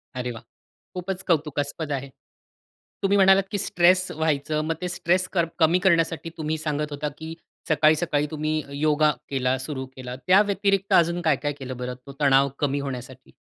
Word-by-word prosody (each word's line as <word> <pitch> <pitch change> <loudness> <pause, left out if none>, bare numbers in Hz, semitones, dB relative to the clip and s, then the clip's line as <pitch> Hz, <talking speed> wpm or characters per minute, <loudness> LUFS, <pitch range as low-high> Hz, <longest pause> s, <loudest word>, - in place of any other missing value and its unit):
अरे 125 -1 -3
वाह! 115 - -10 0.5
खूपच 185 +1 -4
कौतुकास्पद 150 -2 -1
आहे. 140 -1 -3 0.9
तुम्ही 200 +1 +3
म्हणालात, 195 0 +6
की 205 - -1
स्ट्रेस 185 0 +3
व्हायचं, 155 -1 -1
मग 165 +1 -1
ते 180 - -2
स्ट्रेस 180 +1 0
क 175 -3 +3 0.2
कमी 165 +2 +4
करण्यासाठी 165 -3 +1
तुम्ही 155 0 -2
सांगत 150 -1 -3
होता 145 +1 -3
की 160 +1 -7 0.3
सकाळी, 155 0 +4
सकाळी 150 -2 0
तुम्ही 155 0 -1 0.2
योगा 155 0 +3 0.2
केला 130 -1 0
सुरू 130 0 -5
केला. 125 -1 -7
त्या 190 +2 +7
व्यतिरिक्त 200 -1 0
अजून 170 +1 +3
काय, 160 -4 +3
काय 145 +2 -3
केलं 130 -3 -7
बरं 125 0 -4
तो - - -7
तणाव 140 -1 +4
कमी 145 -1 0
होण्यासाठी? 130 -1 -7
155 Hz, 170 wpm, -24 LUFS, 140-175 Hz, 0.9 s, त्या